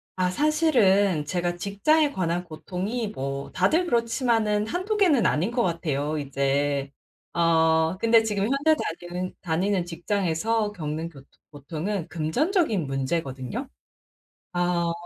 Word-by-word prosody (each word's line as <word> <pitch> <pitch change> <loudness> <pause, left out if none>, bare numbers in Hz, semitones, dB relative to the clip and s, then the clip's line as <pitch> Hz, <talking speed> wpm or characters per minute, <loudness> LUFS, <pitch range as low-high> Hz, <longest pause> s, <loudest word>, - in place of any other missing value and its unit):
아 185 -1 +1
사실은 205 - +3
제가 175 +2 -1
직장에 285 - +2
관한 175 -5 -1
고통이 185 +8 -4
뭐 140 -7 -5
다들 340 +3 +2
그렇지만은 230 -4 +1
1-2 370 - -2
개는 325 - +4
아닌 175 +6 +2
것 240 0 0
같아요 155 -4 -1
이제. 140 0 0 0.4
어 160 0 +3
근데 230 +2 +5
지금 210 -3 -1
현재 280 +7 +3 0.3
다니는 180 +1 -5
다니는 180 +2 0
직장에서 200 +4 -1
겪는 160 -1 -4
교통 140 -4 -15 0.2
고통은 160 +6 -4
금전적인 220 - 0
문제거든요. 135 - -3 0.9
아. 175 -1 +1
180 Hz, 265 characters per minute, -25 LUFS, 160-225 Hz, 0.9 s, 근데